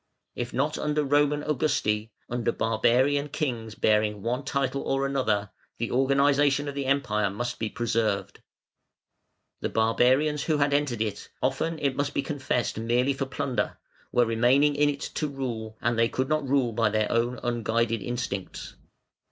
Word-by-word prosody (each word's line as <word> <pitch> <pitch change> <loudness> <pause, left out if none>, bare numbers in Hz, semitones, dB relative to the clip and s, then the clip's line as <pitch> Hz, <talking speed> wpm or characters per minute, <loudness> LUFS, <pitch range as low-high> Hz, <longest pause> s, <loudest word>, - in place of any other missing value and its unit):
If 120 0 -4
not 145 +4 -1
under 150 0 0
Roman 145 +1 +2
Augusti, 115 -7 0 0.2
under 120 -1 -1
barbarian 125 +7 +2
kings 120 -7 -3
bearing 105 -1 +1
one 125 +4 -1
title 140 -1 -1
or 135 0 0
another, 110 -7 0 0.3
the 115 - -3
organisation 140 +2 +3
of 140 - -3
the 140 -1 -3
Empire 115 -7 +1
must 120 +5 -4
be 110 - -1
preserved. 110 -3 -1 1.2
The - - -2
barbarians 130 +7 +2
who 155 -2 +1
had 145 0 +2
entered 140 -6 +1
it, 105 -2 -5
often 165 0 0
it 140 -3 0
must 145 +1 -2
be - - +1
confessed 130 -7 -2
merely 120 +4 +1
for 135 0 -3
plunder, 130 -1 -2 0.3
were 120 - +4
remaining 125 +6 +3
in 145 +1 +3
it 140 -1 -4
to 155 - -1
rule, 115 -6 -5
and 115 -1 +1
they 115 0 +4
could 130 0 -2
not 155 -3 0
rule 130 -4 +2
by 115 -1 +2
their 110 0 0
own 120 +2 0
unguided 115 -1 0
instincts. 120 -6 -4
125 Hz, 160 wpm, -27 LUFS, 115-140 Hz, 1.2 s, were